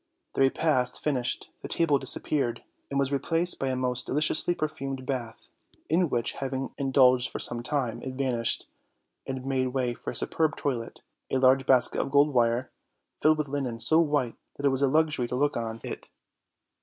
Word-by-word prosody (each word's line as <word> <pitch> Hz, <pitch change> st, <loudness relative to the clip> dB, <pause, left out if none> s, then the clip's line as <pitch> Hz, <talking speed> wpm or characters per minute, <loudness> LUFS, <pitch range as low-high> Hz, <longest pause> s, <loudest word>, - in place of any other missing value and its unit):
Their 135 Hz, -, +3 dB
repast 135 Hz, -2 st, 0 dB
finished, 130 Hz, -5 st, -1 dB
the -, -, -6 dB
table 150 Hz, -4 st, +2 dB
disappeared 130 Hz, -2 st, 0 dB, 0.3 s
and 140 Hz, -, -2 dB
was 140 Hz, 0 st, 0 dB
replaced 165 Hz, +5 st, 0 dB
by 135 Hz, -, -1 dB
a 130 Hz, -, -1 dB
most 125 Hz, -1 st, -1 dB
deliciously 155 Hz, +4 st, +2 dB
perfumed 135 Hz, -4 st, -4 dB
bath, 120 Hz, -4 st, -5 dB, 0.4 s
in 170 Hz, +1 st, +2 dB
which 120 Hz, -3 st, 0 dB
having 135 Hz, 0 st, -4 dB
indulged 130 Hz, -2 st, +4 dB
for -, -, -6 dB
some 120 Hz, 0 st, +2 dB
time, 130 Hz, -2 st, -1 dB
it 130 Hz, -1 st, -6 dB
vanished, 125 Hz, -4 st, 0 dB, 0.6 s
and 130 Hz, -1 st, -5 dB
made 130 Hz, -1 st, 0 dB
way 125 Hz, -1 st, -1 dB
for -, -, -7 dB
a -, -, -5 dB
superb 160 Hz, -2 st, 0 dB
toilette, 120 Hz, -5 st, -4 dB, 0.3 s
and 130 Hz, 0 st, 0 dB
large 130 Hz, 0 st, +4 dB
baskets 130 Hz, -2 st, +4 dB
of -, -, -4 dB
gold 145 Hz, +1 st, +3 dB
wire, 120 Hz, 0 st, +1 dB, 0.5 s
filled 155 Hz, 0 st, +4 dB
with 150 Hz, -1 st, -2 dB
linen 135 Hz, -4 st, -3 dB
so 160 Hz, +6 st, +4 dB
white 145 Hz, -7 st, +1 dB, 0.2 s
that 140 Hz, -, -4 dB
it -, -, +5 dB
was 135 Hz, 0 st, -1 dB
a 140 Hz, -, +4 dB
luxury 150 Hz, -3 st, +1 dB
to 125 Hz, -, -4 dB
look 145 Hz, +3 st, +1 dB
on 115 Hz, -, -2 dB
OLD, 115 Hz, -, -3 dB
OLD 115 Hz, -, -12 dB
FAIRY -, -, -5 dB
TALES. -, -, -35 dB
4g -, -, -13 dB
it. -, -, -31 dB
135 Hz, 200 wpm, -27 LUFS, 125-145 Hz, 0.6 s, it